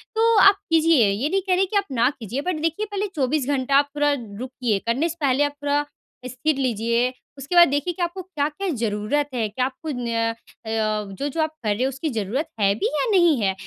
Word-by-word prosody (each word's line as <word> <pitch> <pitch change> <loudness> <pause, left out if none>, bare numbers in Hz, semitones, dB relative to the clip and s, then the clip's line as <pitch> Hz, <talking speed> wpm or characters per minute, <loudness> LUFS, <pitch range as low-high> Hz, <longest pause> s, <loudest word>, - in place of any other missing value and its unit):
तो 455 +1 +3
आप 395 +1 +7 0.2
कीजिए, 320 -8 +5
ये 215 +9 -1
नहीं 390 +2 +1
कह 365 - +4
रही 380 +2 +2
कि 405 +2 -1
आप 400 - +1
ना 245 -1 +3
कीजिए। 235 +4 -4
बट 320 -1 -3
देखिए, 330 +6 -1
पहले 410 +1 -1
24 275 0 0
घंटा 275 -1 0
आप 285 0 +3
पूरा 290 0 +2
रुकिए, 240 -2 -3
करने 270 +9 +1
से 330 - -6
पहले 275 0 +2
आप 290 - 0
पूरा 290 0 +1 0.4
स्थिर 255 +4 -1
लीजिए। 235 -1 0 0.2
उसके 275 +6 -4
बाद 345 0 +8
देखिए 290 +5 -1
कि 355 - -7
आपको 345 +2 -3
क्या-क्या 330 0 -3
ज़रूरत 225 +6 -1
है। 230 -3 0
क्या 250 +4 -1
आपको 270 +5 -6
न 230 -2 -1
अ, - - -20 0.8
जो-जो 285 +7 -2
आप 315 - +1
कर 210 -2 +1
रहे 240 - -1
हो, 265 - +1
उसकी 270 +4 -4
ज़रूरत 230 - -2
है 200 -1 +3
भी 420 - -1
या - - +1
नहीं 345 -7 +4
है? 195 -2 +1
280 Hz, 220 wpm, -23 LUFS, 240-325 Hz, 0.8 s, बाद